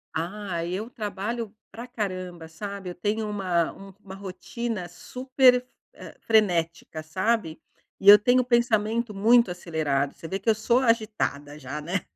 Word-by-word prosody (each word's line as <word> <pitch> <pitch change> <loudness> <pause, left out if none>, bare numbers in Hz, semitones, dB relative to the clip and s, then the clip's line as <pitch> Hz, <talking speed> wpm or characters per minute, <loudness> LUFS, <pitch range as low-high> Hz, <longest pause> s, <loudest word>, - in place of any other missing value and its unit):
Ah, 175 +1 -3
eu 195 +8 -4
trabalho 215 +1 -4 0.2
pra 235 +2 -8
caramba, 185 -7 -5
sabe. 200 +3 -7
Eu - - -5
tenho 210 +4 -1
uma 185 -5 0 0.3
uma 190 -2 -11
rotina 195 +1 -5
super 255 +7 +2
f 250 0 -3 0.3
hã, - - -10
frenética, 170 -7 +1
sabe. 185 +1 -1 0.4
E 195 - -5
eu 210 - +11
tenho 245 +4 +4
o - - -5
pensamento 235 -1 +1
muito 230 +1 +4
acelerado. 155 -6 -1
Você 165 - -10
vê 190 - -2
que 195 +4 -17
eu 225 - +6
sou 220 +3 +2
agitada, 215 - 0
já, 145 +1 -6
né, 175 +5 -2
200 Hz, 155 wpm, -26 LUFS, 175-230 Hz, 0.4 s, eu